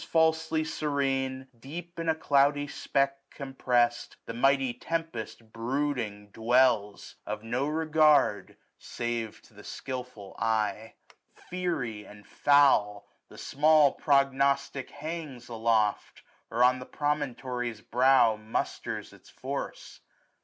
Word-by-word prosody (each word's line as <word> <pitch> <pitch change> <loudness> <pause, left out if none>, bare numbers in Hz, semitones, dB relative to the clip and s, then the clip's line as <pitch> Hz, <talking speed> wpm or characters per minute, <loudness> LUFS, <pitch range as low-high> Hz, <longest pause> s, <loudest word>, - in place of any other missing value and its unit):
Falsely 160 -1 +2
serene, 135 -4 -2
deep 170 +7 -8
in 165 -1 -1
a 160 - +3
cloudy 145 -1 +2
speck 135 -1 -1
Compress'd, 125 -3 -1
the - - -6
mighty 135 +1 +2
tempest 120 -10 -5
brooding 115 -4 -3
dwells 115 -3 +1
j - - -3
Of 105 0 -5
no 125 +5 -1
regard, 155 -9 +2 0.2
save 120 -2 -4
to - - -21
the - - -14
skilful 125 -7 -7
eye. 110 -1 -1 0.2
SUMMER. - - -38 0.2
87 180 -1 -1
Fiery 110 -8 -5
and 105 0 -15
foul, 135 -8 +3 0.2
the - - -14
small 150 0 +4
prognostic 140 -1 +1
hangs 145 -5 -7
990 - - -7
Aloft, 110 -2 0 0.3
or 120 +2 +2
on 130 +1 +4
the 125 - -9
promontory's 125 -6 -3
brow 125 -2 +4
Musters 110 +1 -4
its - - -18
force. - - -6
130 Hz, 120 wpm, -28 LUFS, 115-145 Hz, 0.3 s, small